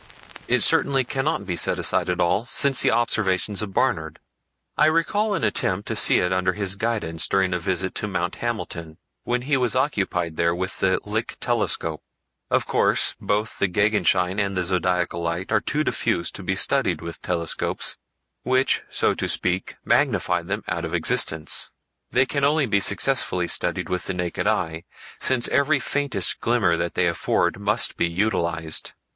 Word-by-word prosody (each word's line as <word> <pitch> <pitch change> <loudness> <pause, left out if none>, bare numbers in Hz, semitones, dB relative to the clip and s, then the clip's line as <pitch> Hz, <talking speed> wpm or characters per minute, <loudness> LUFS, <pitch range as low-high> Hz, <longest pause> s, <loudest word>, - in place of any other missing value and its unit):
It - - +2
certainly 135 -1 +3
cannot 135 -2 -2
be 90 -2 -3
set - - 0
aside - - 0
at 90 0 -1
all 90 +5 +2
since 135 0 +2
the - - +3
observations 105 -4 +1
of 105 -2 -4
Barnard. 85 -10 -1 0.6
I 150 - +4
recall 200 +6 +1
an - - -3
attempt 95 +2 0
to - - -2
see - - +5
it 90 +1 0
under 95 0 +1
his 100 -1 -1
guidance 100 -7 -1
during 95 -2 +1
a 90 - -1
visit 95 +1 -2
to 105 - -2
Mount 90 -3 -3
Hamilton, 85 -9 -4 0.3
when 125 0 -1
he 140 +1 +1
was 125 -2 0
occupied 95 - -1
there 85 0 +1
with 95 +2 -3
the 95 -1 +2
Lick 110 +3 -3
telescope. 120 -1 -1 0.5
Of - - +1
course, - - +1
both 105 +2 -2
the 100 - +3
Gegenschein 95 -1 +1
and 100 -2 -1
the 90 - +1
Zodiacal 90 -1 0
Light 85 +2 -3
are - - +3
too - - -1
diffuse 85 - -1
to - - -9
be - - -2
studied - - +2
with 85 -1 -8
telescopes, 85 -2 -2 0.4
which, 130 +1 +2
so - - +1
to - - -3
speak, 90 +1 -1
magnify 90 -1 +2
them 100 +5 -4
out 85 +1 -3
of 80 +1 -3
existence. 80 -1 +1 0.4
They 130 +1 +3
can 140 +1 -2
only 145 +1 +3
be 100 -4 +1
successfully 95 -4 +2
studied 90 +1 -1
with 90 -1 -3
the 95 - -3
naked 90 +2 -2
eye, 85 -6 -1 0.3
since 130 -2 +3
every 140 +1 +2
faintest 135 -8 +1
glimmer - - +2
that - - -3
they - - +2
afford - - 0
must 105 +3 +1
be - - +1
utilized. 85 -4 -1
95 Hz, 175 wpm, -23 LUFS, 90-120 Hz, 0.6 s, see